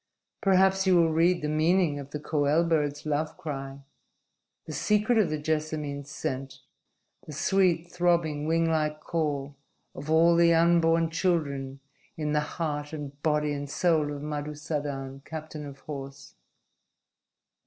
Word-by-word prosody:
Perhaps 190 Hz, -1 st, +3 dB
you 185 Hz, -, +5 dB
will 165 Hz, -2 st, +4 dB
read 175 Hz, +2 st, +3 dB
the -, -, 0 dB
meaning 155 Hz, 0 st, +2 dB
of 140 Hz, -1 st, -8 dB
the 150 Hz, -, -5 dB
koel 150 Hz, +1 st, +1 dB
bird's 150 Hz, -3 st, 0 dB
love 150 Hz, +1 st, -1 dB
cry, 140 Hz, -5 st, -6 dB, 0.8 s
the -, -, -7 dB
secret 215 Hz, +2 st, +2 dB
of 210 Hz, -, +3 dB
the 155 Hz, -, -1 dB
jessamine's 150 Hz, -2 st, -3 dB
scent, 130 Hz, -2 st, -5 dB, 0.7 s
the -, -, -7 dB
sweet, 175 Hz, +1 st, +1 dB
throbbing, 170 Hz, -4 st, +1 dB
winglike 160 Hz, -2 st, +1 dB
call 145 Hz, -4 st, -2 dB, 0.4 s
of 145 Hz, +3 st, -8 dB
all 165 Hz, +2 st, +5 dB
the 170 Hz, 0 st, +5 dB
unborn 165 Hz, -1 st, +3 dB
children 140 Hz, -6 st, -1 dB, 0.4 s
in 150 Hz, -1 st, -2 dB
the 150 Hz, -, +2 dB, 0.2 s
heart 150 Hz, -2 st, -3 dB
and 145 Hz, -2 st, -7 dB
body 150 Hz, -1 st, +1 dB
and 145 Hz, 0 st, -5 dB
soul 155 Hz, -2 st, +1 dB
of 145 Hz, 0 st, -6 dB
Madusadan, 145 Hz, -2 st, -4 dB
captain 155 Hz, -1 st, -7 dB
of 135 Hz, -1 st, -11 dB
horse." 135 Hz, -1 st, -8 dB
155 Hz, 135 wpm, -27 LUFS, 145-165 Hz, 0.8 s, you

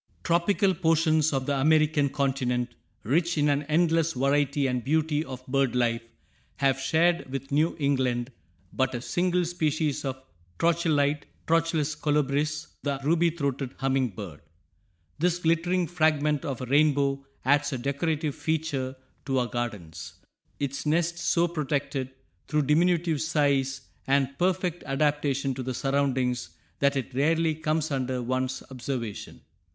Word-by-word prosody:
Tropical 190 Hz, +3 st, +2 dB
portions 160 Hz, -2 st, +2 dB
of 135 Hz, -2 st, -1 dB
the 140 Hz, -, 0 dB
American 150 Hz, 0 st, +3 dB
continent, 125 Hz, -3 st, -1 dB, 0.3 s
rich 165 Hz, -, +1 dB
in 150 Hz, 0 st, +3 dB
an 145 Hz, 0 st, +2 dB
endless 165 Hz, 0 st, +2 dB
variety 140 Hz, +1 st, +1 dB
and 125 Hz, -2 st, -1 dB
beauty 155 Hz, +1 st, +1 dB
of 130 Hz, -3 st, -9 dB
bird 135 Hz, -2 st, +1 dB
life, 115 Hz, -2 st, +1 dB, 0.5 s
have 135 Hz, -1 st, +1 dB
shared 165 Hz, +1 st, +1 dB
with 135 Hz, +1 st, -5 dB
New 155 Hz, +4 st, +2 dB
England 130 Hz, -4 st, 0 dB, 0.4 s
but 130 Hz, -1 st, 0 dB
a 120 Hz, -, -3 dB
single 180 Hz, +2 st, +1 dB
species 155 Hz, -3 st, -1 dB
of 130 Hz, -1 st, -3 dB, 0.4 s
Trochilidæ, 155 Hz, -4 st, +2 dB, 0.2 s
Trochilus 165 Hz, -2 st, +1 dB
colubris, 150 Hz, +1 st, 0 dB, 0.2 s
the 140 Hz, -2 st, -2 dB
ruby 170 Hz, +3 st, +3 dB
throated 140 Hz, -5 st, -3 dB
humming 135 Hz, -1 st, +1 dB
bird. 95 Hz, -7 st, -9 dB, 0.8 s
This 175 Hz, +1 st, +2 dB
"glittering 175 Hz, +2 st, +1 dB
fragment 155 Hz, -2 st, +1 dB
of 135 Hz, -5 st, -4 dB
a -, -, -3 dB
rainbow" 140 Hz, 0 st, +2 dB, 0.2 s
adds 145 Hz, +2 st, +3 dB
a 130 Hz, -, -2 dB
decorative 145 Hz, +3 st, -1 dB
feature 150 Hz, -5 st, -2 dB, 0.3 s
to 135 Hz, -2 st, 0 dB
our 125 Hz, -, +2 dB
gardens, 105 Hz, -10 st, -5 dB, 0.5 s
its 140 Hz, -1 st, -3 dB
nest 170 Hz, +3 st, +1 dB
so 170 Hz, 0 st, +2 dB
protected 140 Hz, -4 st, -2 dB, 0.4 s
through 150 Hz, -1 st, +1 dB
diminutive 165 Hz, +1 st, +2 dB
size 140 Hz, -4 st, +1 dB, 0.3 s
and 140 Hz, 0 st, +2 dB
perfect 180 Hz, -1 st, 0 dB
adaptation 140 Hz, -1 st, 0 dB
to 130 Hz, -, -5 dB
the 130 Hz, 0 st, -3 dB
surroundings 130 Hz, -7 st, 0 dB, 0.3 s
that 140 Hz, 0 st, +3 dB
it 135 Hz, 0 st, -4 dB
rarely 160 Hz, +4 st, +2 dB
comes 155 Hz, 0 st, -1 dB
under 130 Hz, -2 st, -1 dB
one's 130 Hz, +1 st, -2 dB
observation. 125 Hz, -4 st, -5 dB
145 Hz, 135 wpm, -27 LUFS, 135-160 Hz, 0.8 s, American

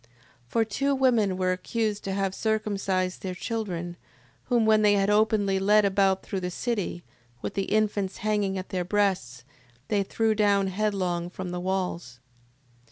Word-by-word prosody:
6:10. 115 Hz, -, -28 dB, 0.4 s
For 225 Hz, -, +1 dB
two 275 Hz, +6 st, 0 dB
women 235 Hz, -8 st, +2 dB
were 185 Hz, -1 st, +1 dB
accused 210 Hz, +3 st, -2 dB
to 195 Hz, -, -2 dB
have 195 Hz, -1 st, -1 dB
circumcised 195 Hz, -4 st, -1 dB
their 185 Hz, -1 st, -4 dB
children: 175 Hz, -6 st, -4 dB, 0.5 s
whom, 240 Hz, -3 st, +2 dB
when 215 Hz, -1 st, +5 dB
they 210 Hz, -1 st, +5 dB
had 200 Hz, 0 st, +2 dB
openly 210 Hz, -2 st, +2 dB
led 210 Hz, +2 st, +4 dB
about 195 Hz, -1 st, +2 dB
through 195 Hz, -, -3 dB
the 180 Hz, -1 st, -3 dB
city, 200 Hz, -3 st, -3 dB, 0.4 s
with -, -, -3 dB
the 195 Hz, -, -1 dB
infants 205 Hz, -2 st, 0 dB
hanging 205 Hz, -2 st, 0 dB
at 185 Hz, -, -6 dB
their 185 Hz, -3 st, -1 dB
breasts, 180 Hz, -, 0 dB, 0.5 s
they 205 Hz, -1 st, +2 dB
threw 220 Hz, +3 st, +1 dB
down 200 Hz, -2 st, +2 dB
headlong 185 Hz, -4 st, -1 dB
from 185 Hz, 0 st, -6 dB
the 180 Hz, -, -3 dB
walls. 180 Hz, -8 st, -3 dB
195 Hz, 165 wpm, -26 LUFS, 185-215 Hz, 0.5 s, when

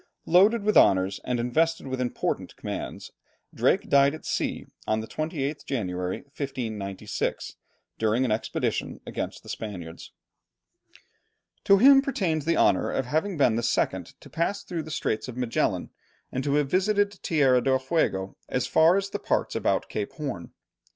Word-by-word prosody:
Loaded 200 Hz, +6 st, +5 dB
with 215 Hz, 0 st, +1 dB
honours, 95 Hz, 0 st, +4 dB
and 125 Hz, -1 st, -1 dB
invested 160 Hz, +8 st, +1 dB
with 130 Hz, -1 st, -3 dB
important 125 Hz, -, -2 dB
commands, -, -, -6 dB, 0.4 s
Drake -, -, +2 dB
died 140 Hz, +1 st, +4 dB
at 155 Hz, -, -12 dB
sea -, -, -2 dB, 0.2 s
on 110 Hz, 0 st, +1 dB
the 110 Hz, -, -4 dB
28th 150 Hz, +1 st, -3 dB
January, 90 Hz, -7 st, -3 dB
1596, 110 Hz, -9 st, -4 dB, 0.4 s
during 110 Hz, +4 st, +2 dB
an 120 Hz, -, -1 dB
expedition 110 Hz, -, -2 dB
against -, -, -5 dB
the -, -, -12 dB
Spaniards. 90 Hz, -6 st, -7 dB, 1.5 s
To 200 Hz, -, +6 dB
him 270 Hz, +5 st, +8 dB
pertains 175 Hz, -, -1 dB
the 165 Hz, -, +2 dB
honour 95 Hz, -2 st, +3 dB
of 135 Hz, -, -1 dB
having 160 Hz, +8 st, -1 dB
been 125 Hz, -6 st, +3 dB
the -, -, 0 dB
second 95 Hz, -6 st, -1 dB
to -, -, -13 dB
pass 170 Hz, +5 st, -1 dB
through 170 Hz, -3 st, -4 dB
the 155 Hz, -, -9 dB
Strait 110 Hz, -7 st, -2 dB
of 125 Hz, -1 st, -8 dB
Magellan, 125 Hz, -2 st, -1 dB, 0.4 s
and 130 Hz, -, -2 dB
to 140 Hz, 0 st, +1 dB
have 145 Hz, -1 st, +2 dB
visited 205 Hz, +2 st, +2 dB
Tierra 135 Hz, -6 st, +3 dB
del 130 Hz, +1 st, +2 dB
Fuego 130 Hz, -, -1 dB
as -, -, 0 dB
far 165 Hz, +4 st, +5 dB
as 200 Hz, 0 st, -2 dB
the -, -, -3 dB
parts -, -, -1 dB
about -, -, 0 dB
Cape -, -, -4 dB
Horn. -, -, -5 dB
135 Hz, 155 wpm, -26 LUFS, 110-165 Hz, 1.5 s, him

